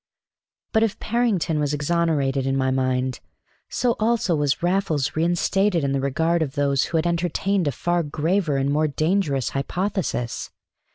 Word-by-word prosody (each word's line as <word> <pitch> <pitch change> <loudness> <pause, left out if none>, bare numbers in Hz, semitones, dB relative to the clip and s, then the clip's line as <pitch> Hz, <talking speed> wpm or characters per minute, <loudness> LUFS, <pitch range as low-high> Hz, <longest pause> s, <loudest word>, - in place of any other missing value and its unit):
But 220 - +3
if 225 -3 +1
Parrington 215 -9 0
was 145 0 0
exonerated 145 -4 0
in 135 0 +1
my 130 -1 +1
mind, 130 -1 0 0.5
so 245 -2 0
also 220 -5 +1
was 145 +1 0
Raffles 175 -6 0
reinstated 175 +2 +1
in 140 - 0
the 135 -1 0
regard 160 +5 +1
of 145 -2 -2
those 140 -2 +2
who 165 - -1
had 160 - 0
entertained 175 +2 0
a - - +2
far 175 +6 0
graver 160 +1 0
and 135 +1 0
more 155 +2 +2
dangerous 155 - 0
hypothesis. 175 - -2
160 Hz, 155 wpm, -23 LUFS, 140-180 Hz, 0.5 s, But